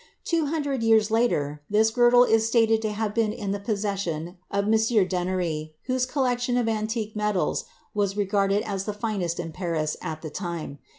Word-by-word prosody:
Two 330 Hz, -3 st, 0 dB
hundred 285 Hz, -4 st, -1 dB
years 220 Hz, -1 st, +4 dB
later 150 Hz, -11 st, +1 dB
this 220 Hz, +2 st, +3 dB
girdle 245 Hz, +1 st, +6 dB
is 225 Hz, -2 st, +3 dB
stated 225 Hz, -1 st, +3 dB
to 215 Hz, -1 st, -1 dB
have 210 Hz, 0 st, -2 dB
been 225 Hz, -2 st, +1 dB
in 205 Hz, -3 st, -4 dB
the 200 Hz, -, -2 dB
possession 195 Hz, -5 st, -3 dB
of 200 Hz, 0 st, 0 dB
a -, -, -3 dB
M. -, -, +2 dB, 0.4 s
d'Ennery, 175 Hz, -4 st, -2 dB
whose 255 Hz, 0 st, 0 dB
collection 245 Hz, -2 st, 0 dB
of 240 Hz, -2 st, +1 dB
antique 220 Hz, 0 st, -2 dB
medals 210 Hz, -3 st, 0 dB, 0.3 s
was 200 Hz, -1 st, 0 dB
regarded 200 Hz, 0 st, +1 dB
as 195 Hz, -3 st, -3 dB
the 210 Hz, -, -2 dB
finest 205 Hz, -6 st, -2 dB
in 165 Hz, -2 st, -4 dB
Paris 160 Hz, -3 st, -2 dB
at 155 Hz, +1 st, -5 dB
the 155 Hz, -, -6 dB
time. 170 Hz, -5 st, -5 dB
210 Hz, 180 wpm, -25 LUFS, 180-225 Hz, 0.4 s, girdle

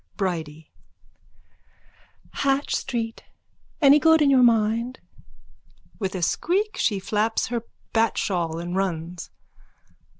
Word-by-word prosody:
_ -, -, -37 dB
BRIDIE: 160 Hz, -5 st, -4 dB, 1.6 s
Hatch 275 Hz, +1 st, 0 dB
street. 230 Hz, -3 st, -4 dB, 0.6 s
Any 285 Hz, +1 st, +7 dB
good 320 Hz, +1 st, +5 dB
in 290 Hz, -2 st, +4 dB
your 260 Hz, -2 st, +5 dB
mind? 230 Hz, +1 st, +2 dB, 1.0 s
_(With 195 Hz, -3 st, -3 dB
a 180 Hz, -, -3 dB
squeak 395 Hz, -, 0 dB
she 205 Hz, -, 0 dB
flaps 215 Hz, +4 st, -1 dB
her 235 Hz, -1 st, -2 dB, 0.3 s
bat 225 Hz, -1 st, +2 dB
shawl 170 Hz, -4 st, -1 dB
and 175 Hz, +1 st, -5 dB
runs. 175 Hz, -2 st, -3 dB
220 Hz, 110 wpm, -24 LUFS, 180-260 Hz, 1.6 s, Any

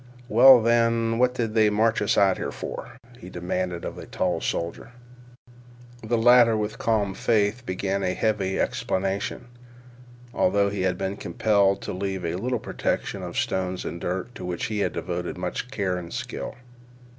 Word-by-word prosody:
"Well, 130 Hz, -2 st, +8 dB
then, 115 Hz, 0 st, +2 dB
what 125 Hz, 0 st, +3 dB
did 115 Hz, -3 st, -2 dB
they 110 Hz, -1 st, +4 dB
march 110 Hz, +2 st, +2 dB
us 105 Hz, -, +1 dB
out 95 Hz, -2 st, +4 dB
here -, -, -3 dB
for?" -, -, -7 dB, 0.2 s
he 90 Hz, -, -10 dB
demanded 90 Hz, 0 st, -3 dB
of -, -, -5 dB
the -, -, -9 dB
tall -, -, -1 dB
soldier. 85 Hz, +8 st, -3 dB, 1.1 s
The 115 Hz, +2 st, 0 dB
latter 120 Hz, -1 st, +6 dB
with 105 Hz, 0 st, -3 dB
calm 105 Hz, -4 st, +1 dB
faith 110 Hz, +3 st, 0 dB
began 95 Hz, +1 st, -1 dB
a 90 Hz, -1 st, -1 dB
heavy 100 Hz, -4 st, 0 dB
explanation, 95 Hz, +5 st, -2 dB, 0.9 s
although 100 Hz, +2 st, +2 dB
he 100 Hz, -2 st, -3 dB
had 90 Hz, -1 st, 0 dB
been 95 Hz, +1 st, -3 dB
compelled 100 Hz, +1 st, +1 dB
to -, -, -4 dB
leave 95 Hz, -1 st, -3 dB
a 80 Hz, -, -1 dB
little 120 Hz, +8 st, -1 dB
protection -, -, -3 dB
of -, -, -6 dB
stones 95 Hz, -1 st, -1 dB
and 85 Hz, -, -5 dB
dirt 95 Hz, +7 st, -3 dB
to -, -, -9 dB
which 90 Hz, -1 st, -3 dB
he 110 Hz, -1 st, -2 dB
had -, -, 0 dB
devoted 90 Hz, 0 st, -4 dB
much 125 Hz, -, -4 dB
care 100 Hz, -7 st, -1 dB
and 85 Hz, -1 st, -7 dB
skill. 125 Hz, 0 st, -5 dB
100 Hz, 170 wpm, -25 LUFS, 95-115 Hz, 1.1 s, Well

